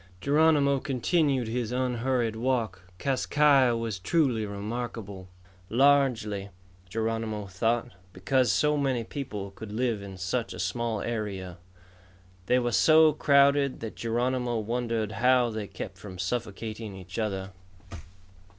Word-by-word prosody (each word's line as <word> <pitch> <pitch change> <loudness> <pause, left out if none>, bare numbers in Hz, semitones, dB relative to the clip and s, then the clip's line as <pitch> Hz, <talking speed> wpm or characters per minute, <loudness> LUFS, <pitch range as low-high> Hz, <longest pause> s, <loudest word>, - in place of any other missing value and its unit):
Geronimo 145 - +3
continued 135 -1 +1
his 120 0 -2
unhurried 125 -2 0
walk. 115 -4 -1 0.2
Kas 135 +5 -1
Kai 145 -3 +5
Ya 120 - +1
was 115 -4 -3
truly 120 - +1
remarkable, 100 -2 -6 0.4
largely, 120 -6 +2 0.4
Geronimo 110 0 -2
thought, 115 +6 -1 0.2
because 120 +8 +1
so 150 0 +2
many 135 -4 0
people 105 -6 -6
could 105 +2 -9
live 115 -1 -1
in 95 -1 -9
such 100 +7 -2
a - - -9
small 110 +4 -2
area. 100 -6 -4 0.9
They 125 - +4
were 120 -1 0
so 155 +3 +6
crowded 140 -1 +3
that 110 -1 -5
Geronimo 120 +1 -1
wondered 115 0 -2
how 125 -1 +4
they 110 -2 -4
kept 95 -1 -8
from 95 -1 -9
suffocating 110 +1 -4
each 95 +2 -8
other. 100 -3 -2
115 Hz, 125 wpm, -28 LUFS, 105-130 Hz, 0.9 s, so